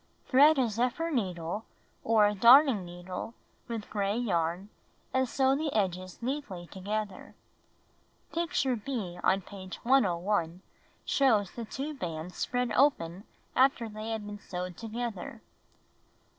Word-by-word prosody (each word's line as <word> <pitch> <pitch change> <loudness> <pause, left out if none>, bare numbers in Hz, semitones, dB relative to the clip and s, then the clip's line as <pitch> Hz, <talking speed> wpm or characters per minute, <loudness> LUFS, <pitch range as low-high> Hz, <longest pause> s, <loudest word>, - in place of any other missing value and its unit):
Thread 290 +4 +6
a 255 -3 +3
zephyr 250 +9 -1
needle 185 - -2 0.4
or 220 -2 +4
a 205 - +2
darning 235 +1 +7
needle 175 +5 -7 0.3
with 230 -3 -5
gray 205 0 0
yarn, 180 -4 -1 0.4
and 260 -1 +2
sew 265 +1 +3
the 300 +1 -1
edges 185 -1 -2
neatly 245 -10 -4
together. 200 +2 -5 1.0
(Picture 320 -6 0
B 210 -7 -4
on 195 +1 +3
page 185 -1 -9
101 190 -7 +1 0.4
shows 220 -9 +3
the 235 - -6
two 275 +7 -4
bands 175 - -5
spread 245 0 -1
open 195 - +2 0.3
after 255 -3 +3
they 215 +1 -6
have 220 -2 -3
been 205 0 -7
sewed 180 -2 -5
together.) 230 -1 -5
215 Hz, 125 wpm, -30 LUFS, 185-255 Hz, 1.0 s, darning